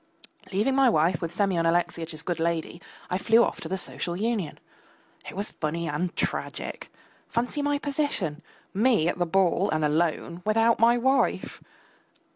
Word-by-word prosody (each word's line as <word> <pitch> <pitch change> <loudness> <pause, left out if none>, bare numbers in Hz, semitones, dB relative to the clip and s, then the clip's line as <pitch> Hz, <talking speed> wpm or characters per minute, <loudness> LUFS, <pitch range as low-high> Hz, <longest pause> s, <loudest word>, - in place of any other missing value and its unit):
Leaving 210 +8 +1
my 270 -1 +5
wife 165 -2 +2
with 165 - -3
Semyon 185 -5 +1
Alexeyitch's 165 -2 -1
good 175 0 -2
lady, 170 +1 -2 0.3
I 180 - 0
flew 225 +3 +5
off - - -2
to 160 - -6
the 190 - -1
Social 175 -1 -4
Union. 205 -5 -2 0.7
It - - -9
was 200 +2 -1
funny 165 +2 -3
and 170 +4 -2
tragic! - - -3 0.4
Fancy 245 +5 -1
my 290 0 +1
position! 280 - -2 0.3
Me 215 -5 +3
at 175 - -1
the 175 - +1
ball 190 +2 +2
and 155 -1 +1
alone, 165 +2 0
without 225 +2 +3
my 235 +1 +5
wife! 265 +3 +1
180 Hz, 155 wpm, -26 LUFS, 165-230 Hz, 0.7 s, my